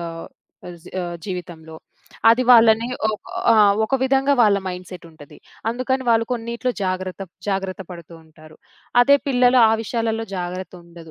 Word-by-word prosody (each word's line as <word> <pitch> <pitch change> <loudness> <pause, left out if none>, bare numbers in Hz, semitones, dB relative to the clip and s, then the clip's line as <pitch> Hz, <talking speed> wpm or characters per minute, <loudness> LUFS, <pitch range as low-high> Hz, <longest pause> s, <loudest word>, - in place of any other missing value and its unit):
ఆహ్, 165 -1 -7 0.4
అజ్ 175 -1 -13 0.2
ఆహ్, 175 -1 -5
జీవితంలో. 175 -4 -8 0.5
అది 230 +3 +4
వాళ్ళని 230 -1 +6 0.2
ఒ - - 0 0.4
ఆహ్, 210 -2 +5
ఒక 270 - -2
విధంగా 270 +1 +2
వాళ్ళ 210 -3 +4
మైండ్‌సెట్టుంటది. 180 -4 -10 0.3
అందుకని 255 +3 -2
వాళ్ళు 230 0 +3
కొన్నీట్లో 235 +1 -3
జాగ్రత్త 185 +1 -4 0.3
జాగ్రత్త 190 -1 -3
పడుతూ 170 -1 -11
ఉంటారు. 155 0 -18 0.4
అదే 280 +3 +5
పిల్లలు 250 -1 +3
ఆ - - +2
విషయాలలో 225 0 -2
జాగ్రత్తుండదు. 175 -2 -8
195 Hz, 130 wpm, -21 LUFS, 175-235 Hz, 0.5 s, వాళ్ళని